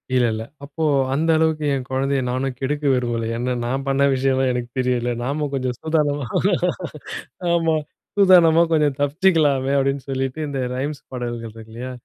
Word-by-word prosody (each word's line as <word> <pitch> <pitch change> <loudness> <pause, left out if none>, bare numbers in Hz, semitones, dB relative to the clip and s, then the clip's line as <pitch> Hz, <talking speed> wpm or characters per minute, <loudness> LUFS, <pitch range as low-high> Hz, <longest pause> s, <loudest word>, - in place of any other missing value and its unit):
இல்ல, 125 -1 +4
இல்ல. 110 0 -4 0.2
அப்போ 145 +3 -5 0.3
அந்த 160 +4 0
அளவுக்கு 160 -1 +1
என் 130 -2 -3
குழந்தைய 135 +1 0
நானும் 130 +1 -2
கெடுக்க 145 +2 -2
விரும்பல. 120 -2 -1
ஏன்னா, 125 +2 -1
நான் 135 +3 -2
பண்ண 135 0 +2
விஷயம்லாம் 130 0 +1
எனக்கு 120 -1 -3
தெரியும்ல. 125 -1 0
நாம 145 +4 -1
கொஞ்சம் 130 -2 -1
சூதானமா 150 -3 0 1.3
ஆமா. 165 -2 +2 0.4
சூதானமா 175 -4 +6
கொஞ்சம் 150 -3 +2
தப்பிச்சிக்கலாமே! 145 -3 +2
அப்பிடின்னு 135 0 0
சொல்லிட்டு, 135 +2 -2
இந்த 140 -2 -3 0.2
ரைம்ஸ் 140 +2 -3
பாடல்கள் 120 -3 -5
இருக்கு 110 0 -12
இல்லயா! 125 +2 -6
135 Hz, 150 wpm, -21 LUFS, 125-150 Hz, 1.3 s, சூதானமா